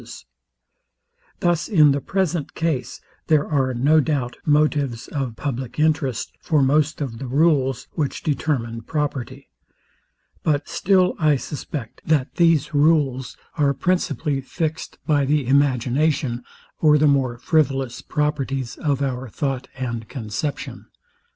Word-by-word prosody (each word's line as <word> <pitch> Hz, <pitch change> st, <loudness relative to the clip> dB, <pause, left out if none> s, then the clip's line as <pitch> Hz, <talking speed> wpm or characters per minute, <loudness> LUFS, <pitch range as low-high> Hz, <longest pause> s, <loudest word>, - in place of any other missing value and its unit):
Thus, 175 Hz, -3 st, +1 dB
in 155 Hz, -9 st, +5 dB
the 140 Hz, 0 st, 0 dB
present 180 Hz, -5 st, -1 dB
case, 160 Hz, -6 st, -2 dB, 0.3 s
there 155 Hz, -2 st, +3 dB
are, 135 Hz, -3 st, +1 dB
no 145 Hz, +6 st, +4 dB
doubt, 140 Hz, -5 st, -1 dB
motives 145 Hz, -5 st, +1 dB
of 135 Hz, -5 st, -3 dB
public 130 Hz, -3 st, -4 dB
interest 150 Hz, -6 st, 0 dB
for 150 Hz, -4 st, +2 dB
most 150 Hz, +3 st, +2 dB
of 120 Hz, -5 st, -4 dB
the 135 Hz, -, -5 dB
rules, 135 Hz, -2 st, +2 dB
which 145 Hz, -4 st, -3 dB
determine 125 Hz, -6 st, -1 dB
property; 145 Hz, -2 st, -4 dB, 0.9 s
but 145 Hz, -1 st, 0 dB
still 185 Hz, -1 st, +2 dB
I 155 Hz, -2 st, +4 dB
suspect, 135 Hz, -3 st, -6 dB
that 150 Hz, -5 st, +1 dB
these 165 Hz, -3 st, +3 dB
rules 145 Hz, -4 st, +2 dB, 0.2 s
are 140 Hz, -1 st, +3 dB
principally 150 Hz, -3 st, 0 dB
fixed 160 Hz, +4 st, -4 dB
by 145 Hz, -2 st, +2 dB
the 145 Hz, 0 st, +1 dB
imagination, 135 Hz, 0 st, +1 dB, 0.4 s
or 150 Hz, -1 st, +5 dB
the 150 Hz, -, +3 dB
more 135 Hz, -4 st, +2 dB
frivolous 135 Hz, -2 st, 0 dB
properties 140 Hz, -4 st, -2 dB
of 140 Hz, -3 st, 0 dB
our 130 Hz, -2 st, -3 dB
thought 135 Hz, +2 st, -3 dB
and 120 Hz, -3 st, -4 dB
conception. 130 Hz, +3 st, -5 dB
145 Hz, 125 wpm, -22 LUFS, 130-155 Hz, 0.9 s, in